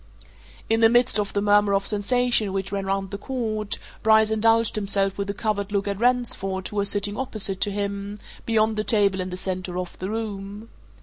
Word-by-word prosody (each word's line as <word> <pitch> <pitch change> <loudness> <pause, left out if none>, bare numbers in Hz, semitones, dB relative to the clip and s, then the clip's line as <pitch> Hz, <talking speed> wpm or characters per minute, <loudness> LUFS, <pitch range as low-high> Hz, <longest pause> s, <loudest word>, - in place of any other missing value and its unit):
In 225 0 +2
the 225 0 +6
midst 240 -1 +3
of 205 -1 -1
the 200 - -1
murmur 205 -1 +4
of 195 0 0
sensation 220 0 +1
which 195 -1 -3
ran 195 -1 -3
round 195 0 -2
the 200 - -5
court, 215 -4 -3 0.2
Bryce 220 0 +4
indulged 225 +1 +3
himself 195 -2 0
with 200 0 -4
a - - -1
covert 205 -2 -2
look 200 -1 0
at 200 -1 -2
Ransford 230 -6 0
who 210 - -7
was 200 0 +1
sitting 205 0 0
opposite 210 -7 -2
to - - +2
him, 200 0 -4 0.3
beyond 220 -1 +1
the 215 - 0
table 200 -4 +2
in 185 - -4
the 180 - -5
centre 185 -1 -3
of 180 -1 -5
the 185 - -4
room. 210 0 -5
205 Hz, 200 wpm, -24 LUFS, 195-220 Hz, 0.3 s, the